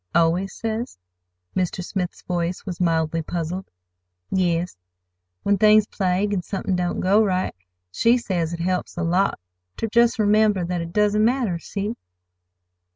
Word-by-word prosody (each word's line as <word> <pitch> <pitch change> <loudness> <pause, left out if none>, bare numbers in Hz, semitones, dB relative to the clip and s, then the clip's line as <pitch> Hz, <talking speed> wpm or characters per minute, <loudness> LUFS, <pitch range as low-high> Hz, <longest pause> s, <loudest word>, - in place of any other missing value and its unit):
"Always 170 +4 +2
says?" 225 - -4 0.6
Mr. 180 -1 -1
Smith's 180 -3 -4
voice 175 +1 -2
was 180 -3 -5
mildly 165 -1 +1
puzzled. 175 +3 -4 0.6
"Yes, 175 - 0 0.7
when 200 -1 +2
things 215 0 +6
plague, 195 0 0
an' 190 - 0
somethin' 190 +1 -2
don't 180 -1 -1
go 200 +4 +4
right. 185 -2 0 0.4
She 230 - +3
says 175 -8 -2
it 170 -1 -4
helps 180 0 -2
a 175 - -1
lot 180 +4 +1 0.4
ter - - -1
just 235 +2 +3
remember 210 -3 +3
that 175 0 -2
it 170 0 -6
doesn't 210 +2 +2
matter. 230 -7 +1
See?" 205 +5 -4
185 Hz, 145 wpm, -23 LUFS, 175-210 Hz, 0.7 s, things